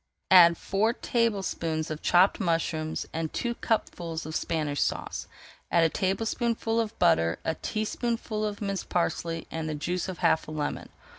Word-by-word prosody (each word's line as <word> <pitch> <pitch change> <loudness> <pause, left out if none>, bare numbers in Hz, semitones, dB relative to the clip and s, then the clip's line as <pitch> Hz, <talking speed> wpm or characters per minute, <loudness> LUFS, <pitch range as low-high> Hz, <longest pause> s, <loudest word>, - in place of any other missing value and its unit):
Add 170 -3 +8
four 215 +4 +1
tablespoonfuls 195 - -1
of 155 - -5
chopped 185 +2 +4
mushrooms, 165 -4 -1
and 160 -1 -2
two 240 -1 -2
cupfuls 170 -9 -2
of 155 0 -5
Spanish 150 -3 -1
Sauce. - - -2 0.4
Add 170 - +4
a 165 - +4
tablespoonful 225 +4 0
of 225 -1 -2
butter, 85 +1 +3
a 160 - +1
teaspoonful 215 +3 -2
of 210 0 -3
minced 195 -2 -3
parsley, 165 -1 -1
and 160 -1 -3
the 155 - -2
juice 175 +5 -2
of 185 - -5
half 165 -2 +2
a - - -7
lemon. 150 -1 -3
175 Hz, 155 wpm, -28 LUFS, 160-215 Hz, 0.4 s, Add